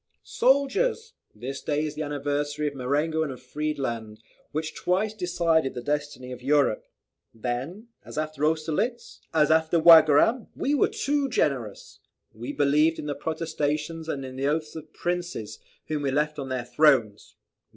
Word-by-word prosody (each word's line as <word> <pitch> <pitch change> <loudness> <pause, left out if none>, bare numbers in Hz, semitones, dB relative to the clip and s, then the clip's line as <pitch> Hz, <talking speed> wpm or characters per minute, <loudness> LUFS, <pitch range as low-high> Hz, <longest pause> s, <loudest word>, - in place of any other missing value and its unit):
"Soldiers! 445 - +1 0.2
this 130 +5 -6
day 150 0 -1
is 150 - -4
the 155 - -5
anniversary 145 0 -2
of 145 - -3
Marengo 145 +5 0
and 155 -3 -1
of 130 - -9
Friedland, 120 -8 -4 0.3
which 155 +1 -3
twice 195 +4 0
decided 170 -7 +1
the 125 - -5
destiny 145 -3 -3
of 125 -1 -8
Europe. 140 -4 +2 0.5
Then, 130 - -4
as - - -10
after 155 -1 -3
Austerlitz, 160 +10 -1
as 155 -1 +3
after 160 +1 +3
Wagram, 160 - +6
we 280 - 0
were 290 - +4
too 285 -1 -1
generous! 125 - -2 0.3
We 120 +5 -6
believed 150 +3 +3
in - - -6
the 145 - -2
protestations 155 +1 -3
and 135 -3 -3
in 130 0 -8
the 135 +1 0
oaths 155 +1 -1
of 155 -1 -9
princes, 175 -10 -4 0.3
whom 155 -1 -2
we 140 - 0
left 150 +2 0
on 135 -1 -5
their 130 -2 -3
thrones. 125 -5 +2
150 Hz, 155 wpm, -26 LUFS, 135-165 Hz, 0.5 s, Wagram